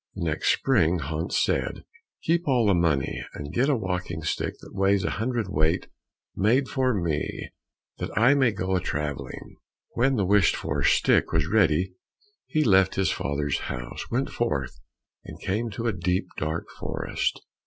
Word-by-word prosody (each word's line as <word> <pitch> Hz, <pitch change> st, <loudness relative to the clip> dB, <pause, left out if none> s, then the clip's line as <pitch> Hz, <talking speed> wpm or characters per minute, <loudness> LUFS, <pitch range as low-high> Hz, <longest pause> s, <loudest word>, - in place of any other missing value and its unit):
The -, -, -4 dB
next 80 Hz, -2 st, +1 dB
spring, 80 Hz, +3 st, +2 dB
Hans 80 Hz, +1 st, -2 dB
said, -, -, -1 dB, 0.4 s
"Keep 170 Hz, +1 st, +1 dB
all 125 Hz, -4 st, +3 dB
the 100 Hz, -, +4 dB
money 80 Hz, -6 st, +1 dB
and 75 Hz, 0 st, -7 dB
get 135 Hz, +4 st, +2 dB
a 145 Hz, -, +3 dB
walking 90 Hz, -5 st, -3 dB
stick 75 Hz, -, -2 dB
that -, -, -13 dB
weighs 100 Hz, 0 st, +2 dB
a -, -, 0 dB
hundred 120 Hz, -1 st, 0 dB
weight 80 Hz, -1 st, +1 dB, 0.5 s
made 120 Hz, +7 st, +3 dB
for 130 Hz, -1 st, +1 dB
me 85 Hz, -8 st, -2 dB, 0.5 s
that -, -, -3 dB
I 120 Hz, +6 st, +6 dB
may 130 Hz, -4 st, +3 dB
go 95 Hz, -2 st, -1 dB
a 90 Hz, -, +1 dB
travelling." 75 Hz, -4 st, -5 dB, 0.3 s
When 135 Hz, +3 st, +2 dB
the 100 Hz, -5 st, +1 dB
wished 100 Hz, -2 st, +4 dB
for -, -, -2 dB
stick -, -, +3 dB
was -, -, +2 dB
ready, 90 Hz, -2 st, +2 dB, 0.5 s
he 155 Hz, -, +1 dB
left 95 Hz, -5 st, +4 dB
his 95 Hz, -1 st, +2 dB
father's 70 Hz, +1 st, -1 dB
house, -, -, -6 dB
went 130 Hz, +3 st, -1 dB
forth, 70 Hz, -, -2 dB, 0.4 s
and -, -, -10 dB
came 110 Hz, +5 st, -1 dB
to 115 Hz, +2 st, -5 dB
a 115 Hz, -, +1 dB
deep, 90 Hz, 0 st, 0 dB
dark 80 Hz, +2 st, -3 dB
forest. -, -, -2 dB
95 Hz, 165 wpm, -26 LUFS, 80-115 Hz, 0.5 s, I